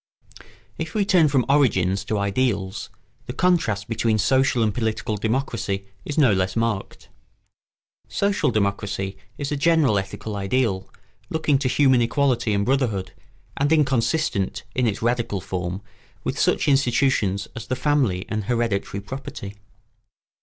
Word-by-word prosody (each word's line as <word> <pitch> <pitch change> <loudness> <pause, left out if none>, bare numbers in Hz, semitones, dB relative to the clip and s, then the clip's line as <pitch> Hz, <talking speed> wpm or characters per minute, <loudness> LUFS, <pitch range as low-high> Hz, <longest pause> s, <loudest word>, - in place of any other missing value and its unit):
] - - -27
If 160 +3 -4
we 205 -2 +2
turn 180 -5 +5
from 135 -3 +2
origins 100 -9 +2
to 110 - -1
ideals, 100 -1 -1 0.4
the 125 - -4
contrast 125 - +1
between 115 -1 +1
social 130 +2 +2
and 105 -2 +1
political 110 -1 -2
democracy 110 -3 -2 0.2
is 145 - -5
no 130 -9 +5
less 95 -1 0
marked. 115 -4 -2 1.0
Social 200 -6 +1
democracy 100 -2 -1 0.2
is 145 0 -4
a - - +1
general 150 - +3
ethical 105 +2 -6
ideal, 100 -1 0 0.4
looking 155 -3 +1
to 135 - 0
human 130 -1 +4
equality 125 -2 +1
and 100 0 +1
brotherhood, 120 -8 0 0.5
and 145 +2 +1
inconsistent, 140 - +1
in 125 -1 +1
its 105 0 -2
radical 120 -4 0
form, 90 +1 -4 0.4
with - - -3
such - - +2
institutions 130 -7 +2
as 115 - -7
the 130 - -1
family 130 -12 +1
and 105 -2 -3
hereditary 115 -4 -1
property. 105 -3 -7
115 Hz, 140 wpm, -23 LUFS, 100-135 Hz, 1.0 s, turn